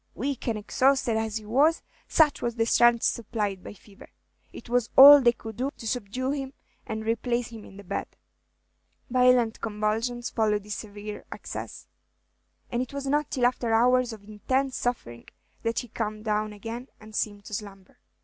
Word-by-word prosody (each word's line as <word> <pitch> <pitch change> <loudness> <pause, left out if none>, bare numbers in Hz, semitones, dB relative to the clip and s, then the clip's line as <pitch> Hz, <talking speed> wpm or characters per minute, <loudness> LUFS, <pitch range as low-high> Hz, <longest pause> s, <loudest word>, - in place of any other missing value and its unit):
Weak 270 +1 -3
and 225 -2 0
exhausted 260 +3 +1
as 220 -1 -1
he 215 - -9
was, 285 +9 +2 0.2
such 310 -4 +3
was 235 -1 -2
the 225 -1 +1
strength 240 0 +4
supplied 210 -4 -1
by - - -9
fever, 200 -1 -17 0.4
it - - -11
was 245 -1 0
all 285 +2 +12
that 260 - -4
they 240 - +7
could 225 -2 -10
do 260 +3 -1
to 225 - -7
subdue 250 +3 -2
him 270 -2 -4 0.3
and 220 -2 -4
replace 235 +1 -1
him 225 -2 -10
in 195 - -14
the 200 - -10
bed; 180 - -4 1.0
violent 250 -2 +3
convulsions 225 +3 -2
followed 210 -2 +1
this 210 0 -6
severe 210 0 -8
access, - - -7 0.9
and 240 - 0
it 255 +1 -6
was 280 0 -4
not 295 +2 0
till 250 -2 0
after 245 -2 0
hours 250 +1 +3
of 215 -2 -10
intense 255 +6 -2
suffering 120 - -4 0.3
that 230 0 -2
he 245 - -2
calmed 215 -1 -5
down 215 0 0
again 225 +5 -7
and 215 0 -14
seemed 205 -1 -2
to - - -10
slumber. 195 -2 -8
230 Hz, 180 wpm, -26 LUFS, 215-250 Hz, 1.0 s, all